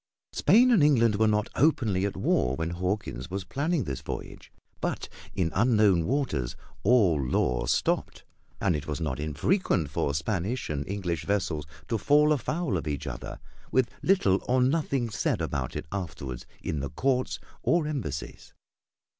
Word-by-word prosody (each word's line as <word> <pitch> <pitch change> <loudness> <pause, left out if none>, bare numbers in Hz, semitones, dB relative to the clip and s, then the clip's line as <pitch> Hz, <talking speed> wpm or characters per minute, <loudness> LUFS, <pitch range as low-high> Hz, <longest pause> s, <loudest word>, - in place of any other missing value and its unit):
Spain 250 +3 +5
and 215 -9 +5
England 115 -8 +4
were 110 +1 +4
not 105 0 +2
openly 110 - +2
at 100 - -6
war 65 +1 +1
when 80 +3 -2
Hawkins 90 - -3
was 95 +1 -3
planning 145 - 0
this 70 -7 -4
voyage, - - -7 0.3
but - - -2 0.3
in 85 -3 0
unknown 105 -6 +3
waters 115 - -1 0.3
all 100 - +4
law 60 -1 0
stopped; - - 0 0.4
and 95 -4 +2
it 75 - -4
was 75 +1 -3
not 75 -5 -2
infrequent 80 - 0
for 70 -1 -1
Spanish 100 - -2
and 70 -1 -3
English 90 -6 -2
vessels 90 -7 -1 0.2
to 115 - -1
fall 150 +6 +4
afoul 150 - -1
of 80 - -5
each 75 -2 -3
other - - -6 0.3
with 130 -2 +2
little 100 - +3
or 130 +1 +3
nothing 130 -3 +1
said 105 - 0
about - - -3
it - - -4
afterward 70 -10 -5 0.2
in 75 - -2
the 70 0 -3
Courts 130 - 0 0.2
or 170 -2 +2
Embassies. 135 - -5
100 Hz, 155 wpm, -28 LUFS, 75-130 Hz, 0.4 s, Spain